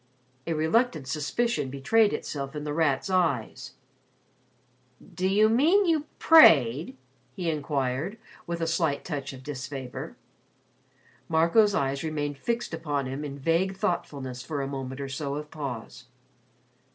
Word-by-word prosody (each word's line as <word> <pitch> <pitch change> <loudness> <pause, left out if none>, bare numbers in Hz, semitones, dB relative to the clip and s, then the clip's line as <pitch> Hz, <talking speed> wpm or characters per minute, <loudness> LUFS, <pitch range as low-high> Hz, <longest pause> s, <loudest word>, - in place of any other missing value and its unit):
'" 130 +2 -39
A 165 - 0
reluctant 160 - +1
suspicion 150 - -1
betrayed 205 +11 +2
itself 140 -1 -5
in 150 - -4
The 150 -1 -3
Rat's 150 -2 +1
eyes. 150 - -1 1.4
"Do 185 0 -1
you 210 +3 +4
mean 315 - +4
you 320 -4 +1
prayed?" 150 - +6 0.4
he 175 -3 -1
inquired, 145 - -2 0.3
with 170 0 -3
a - - +1
slight 165 -3 0
touch 145 -5 -4
of 130 -1 -11
disfavor. 135 -2 -6 1.1
Marco's 170 +6 +4
eyes 135 +1 -1
remained 145 -3 -3
fixed 235 -1 -2
upon 145 -4 -2
him 135 +3 -5
in 140 -1 -6
vague 170 +6 0
thoughtfulness 135 -9 -3
for 140 +1 -3
a - - -3
moment 135 -1 -5
or 140 - -4
so 140 +1 -3
of 150 0 -6
pause. 130 -6 -6
150 Hz, 140 wpm, -27 LUFS, 135-180 Hz, 1.4 s, prayed